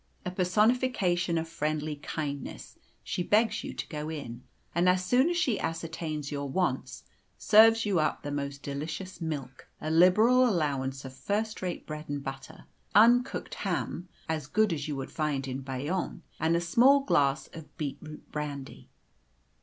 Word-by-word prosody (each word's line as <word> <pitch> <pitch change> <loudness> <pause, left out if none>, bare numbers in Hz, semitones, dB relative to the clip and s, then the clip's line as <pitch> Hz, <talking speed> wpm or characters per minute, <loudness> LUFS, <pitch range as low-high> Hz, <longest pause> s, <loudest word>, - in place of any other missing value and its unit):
A 180 - -2
personification 185 -2 +2
of 165 0 -2
friendly 155 -1 -2
kindness, 145 -1 -6 0.2
she - - -3
begs 210 +4 +2
you - - -5
to - - -5
go 150 -2 -5
in, 125 -6 -6 0.3
and 175 +2 +3
as 185 0 +2
soon 255 - +4
as 350 - 0
she 255 - +1
ascertains 160 -3 -4
your 140 -1 -3
wants, 180 +6 -1 0.3
serves 225 +1 +6
you 195 -5 +2
up 155 -1 0
the 145 - -4
most 140 -1 -4
delicious 155 +6 -5
milk, 145 -5 -5
a 155 - -3
liberal 210 +10 +6
allowance 140 - -1
of 130 - -8
first 215 +7 -2
rate 180 -2 -4
bread 155 0 -7
and 145 -1 -3
butter, 135 0 -8 0.3
uncooked 240 +4 +4
ham 180 +1 -3 0.2
as 155 -3 -2
good 210 +4 +2
as 145 -1 -4
you 150 - -3
would 135 -1 -5
find 145 -4 -1
in 130 0 -3
Bayonne 135 +7 -3 0.2
and 160 +1 +2
a 170 - +1
small 250 +11 +5
glass 145 - +2
of 160 -2 -11
beetroot 150 +1 -6
brandy. 145 -3 -6
160 Hz, 160 wpm, -29 LUFS, 145-190 Hz, 0.3 s, serves